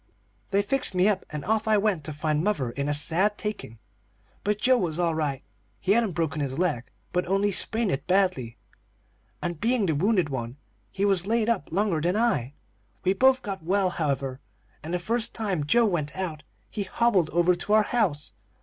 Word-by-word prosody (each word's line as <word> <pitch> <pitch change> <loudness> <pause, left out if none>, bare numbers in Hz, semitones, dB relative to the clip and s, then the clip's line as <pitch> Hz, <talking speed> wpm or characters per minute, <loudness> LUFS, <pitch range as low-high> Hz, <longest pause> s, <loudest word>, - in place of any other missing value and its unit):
They 200 +1 +2
fixed 210 -2 0
me 180 +2 +4
up 200 -3 0
and 150 -1 -6
off 220 +2 0
I 215 -1 +4
went, 200 -6 0
to 155 - -3
find 155 +1 -1
mother 145 - 0
in 140 +3 -3
a - - +1
sad 185 +8 +2
taking. 210 - -5 0.7
But 210 0 0
Joe 255 +2 +4
was 165 -4 -2
all 170 -2 +1
right; 150 -4 -2 0.4
he 190 - 0
hadn't 220 -3 +2
broken 160 -3 -1
his 135 -2 -3
leg, 155 -9 0 0.3
but 180 0 0
only 195 +2 +2
sprained 220 +2 +2
it 135 +2 -3
badly, 180 -12 +1 0.9
and 175 -3 -3
being 235 -2 +2
the 165 - +1
wounded 180 +1 +2
one 120 -1 -5 0.3
he 195 - -1
was 195 -2 +1
laid 230 0 +1
up 215 -10 -1
longer 190 -3 +1
than 175 +4 +1
I. 145 - 0 0.5
We 190 - +3
both 260 +5 +3
got 195 -3 -5
well, 185 +2 +1
however, 140 -5 -2 0.4
and 160 - -7
the 180 - +1
first 225 +6 -1
time 195 -9 -1
Joe 235 +8 +4
went 170 -6 -2
out 165 -5 -3 0.3
he 210 - -3
hobbled 195 -4 +1
over 175 +2 +3
to 175 +4 -2
our 215 0 +6
house. 185 - -1
185 Hz, 195 wpm, -26 LUFS, 155-210 Hz, 0.9 s, our